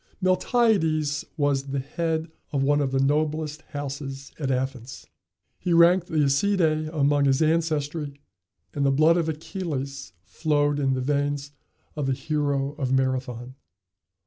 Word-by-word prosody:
Miltiades 185 -6 +2
was 140 -2 +1
the 140 0 -3
head 160 +3 -2 0.2
of 140 -2 0
one 145 +1 +3
of 135 -2 0
the 135 - +1
noblest 150 +2 0
houses 140 -1 -6
at 140 -3 -2
Athens. 130 -1 -3 0.5
He 180 -2 0
ranked 170 +2 +5
the 160 - -3
Æacidæ 155 +1 +2
among 145 -2 +2
his 135 -1 +3
ancestry, 155 -2 0 0.5
and 145 - -1
the 140 - +4
blood 155 +5 +4
of 165 -2 0
Achilles 150 -4 -5
flowed 145 - 0
in 135 -2 +1
the 130 - -2
veins 145 +1 -1 0.4
of 150 -3 -2
the 135 - +2
hero 140 -1 -1
of 130 -3 -1
Marathon. 130 -2 -1
145 Hz, 140 wpm, -25 LUFS, 135-160 Hz, 0.5 s, ranked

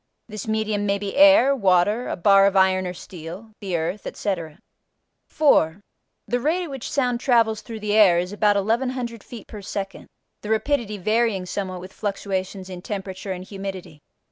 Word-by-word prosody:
This 215 -1 -7
medium 215 -1 -1
may 200 0 +2
be 200 0 -5
air, 285 -2 +7
water, 205 +2 +2
a - - -2
bar 195 +2 +5
of 200 - 0
iron 190 -1 +3
or 180 - -4
steel, 180 +6 -9
the 190 -4 -2
earth, 165 +6 -3
etc. 170 -6 -4 0.7
4. 190 - +3 0.5
The 245 - 0
rate 325 +8 0
at 330 - -7
which 270 -3 -6
sound 250 -4 0
travels 230 -4 +2
through 225 -2 -8
the 210 0 -1
air 205 -5 +6
is 180 +3 -2
about 205 0 +3
1100 235 +2 -1
feet 230 -5 -10
per 210 - -9
second, 195 0 -6 0.3
the 210 - -7
rapidity 220 -1 0
varying 215 -1 +1
somewhat 185 -1 -4
with 185 +1 -11
fluctuations 195 -2 -3
in 180 -2 -8
temperature 190 -1 -5
and 185 -1 -5
humidity. 190 -5 -7
205 Hz, 170 wpm, -23 LUFS, 185-230 Hz, 0.7 s, air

